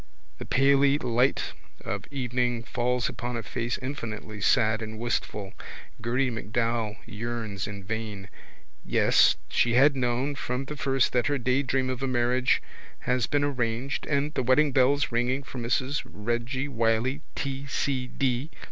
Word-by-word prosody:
The - - -6
paly 140 +1 +4
light 125 +3 +1 0.3
of 100 +1 -3
evening 125 -3 -1
falls 125 0 0
upon 120 0 -4
a 115 - -4
face 120 +2 -2
infinitely 110 -5 -5
sad 110 0 +3
and 110 0 -6
wistful. 105 -3 -2 0.5
Gerty 125 +3 +1
MacDowell 115 -1 -1
yearns 110 -3 -4
in 100 -1 -7
vain. 105 -1 -4 0.6
Yes, - - +4
she 120 0 +2
had 140 +3 +6
known 125 +2 0
from 130 -1 -3
the 150 - -5
very 135 -2 -1
first - - +4
that 125 -1 +2
her 145 -1 +1
daydream 130 +1 +1
of 130 0 -4
a 135 - 0
marriage 125 +1 +2 0.4
has 125 -2 +1
been 145 0 +1
arranged 125 -1 -1
and 145 +1 0
the - - 0
weddingbells 140 +1 +3
ringing 125 +3 0
for 130 - -7
Mrs 130 +4 0
Reggy 120 +5 -2
Wylie 120 +2 +1
T. 135 0 -3
C. 130 -2 -1
D. 130 +2 -1
125 Hz, 150 wpm, -27 LUFS, 115-135 Hz, 0.6 s, had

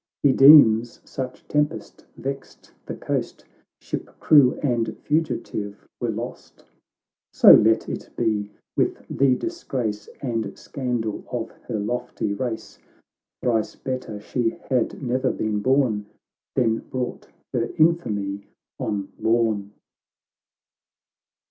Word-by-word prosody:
He 140 -2 +5
deems— 120 -5 +7
such 130 -1 -6
tempest 150 +2 -2
vexed 135 +1 -7 0.2
the - - -4
coast - - -3 0.2
— - - -55
Ship, - - -5
crew, 140 -5 +6
and 120 -5 0
fugitive, 110 -9 -2
were - - -1
lost. - - -7 0.3
— - - -66 0.3
So - - +8
let 110 +1 +4
it - - -5
be, 105 -2 0 0.3
with - - 0
the 135 -2 +4
disgrace 125 - -4
And 115 -6 -3
scandal 120 -5 -3
of 115 -2 -3 0.2
her 115 - -2
lofty 120 -1 -2
race! 115 +1 -5 0.6
Thrice 115 -3 0
better 130 -5 -5
she 115 +2 -1 0.2
had 125 +2 0
ne'er 130 +1 +1
been 105 -1 -1
born, 120 -4 +1 0.5
Than 115 -4 +2
brought 125 -1 -5 0.3
her 120 -2 0
infamy 105 -12 +1 0.3
on 100 -2 -2
Lorn 110 -3 +1
120 Hz, 115 wpm, -24 LUFS, 110-130 Hz, 0.6 s, So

